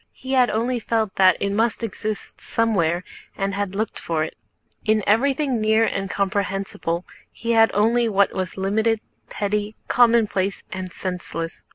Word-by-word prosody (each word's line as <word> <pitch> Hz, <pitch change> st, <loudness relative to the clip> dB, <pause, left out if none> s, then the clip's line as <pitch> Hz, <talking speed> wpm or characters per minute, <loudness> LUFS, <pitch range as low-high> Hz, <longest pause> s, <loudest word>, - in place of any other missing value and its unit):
He 260 Hz, -, -8 dB
had 255 Hz, -2 st, +4 dB
only 240 Hz, +3 st, 0 dB
felt 220 Hz, -3 st, -1 dB
that 185 Hz, -1 st, +6 dB
it 200 Hz, -, 0 dB
must 225 Hz, +3 st, 0 dB
exist 215 Hz, -1 st, -4 dB
somewhere 180 Hz, -7 st, +1 dB, 0.3 s
and 195 Hz, 0 st, -1 dB
had 200 Hz, -1 st, -2 dB
looked 220 Hz, +1 st, -2 dB
for 160 Hz, -2 st, -1 dB
it. 155 Hz, -, -6 dB, 0.5 s
In 215 Hz, -1 st, +2 dB
everything 265 Hz, +2 st, +2 dB
near 220 Hz, +1 st, +4 dB
and 195 Hz, -3 st, -2 dB
comprehensible 195 Hz, -3 st, -2 dB, 0.3 s
he 235 Hz, -, -3 dB
had 225 Hz, -1 st, +6 dB
seen -, -, -1 dB
only 230 Hz, +2 st, +3 dB
what 200 Hz, -1 st, +3 dB
was 185 Hz, -1 st, -3 dB
limited, 215 Hz, +4 st, +1 dB, 0.3 s
petty, 210 Hz, +1 st, -2 dB
commonplace, 225 Hz, -5 st, +3 dB
and 185 Hz, -3 st, -5 dB
senseless. 175 Hz, -2 st, -5 dB
210 Hz, 155 wpm, -23 LUFS, 195-225 Hz, 0.5 s, that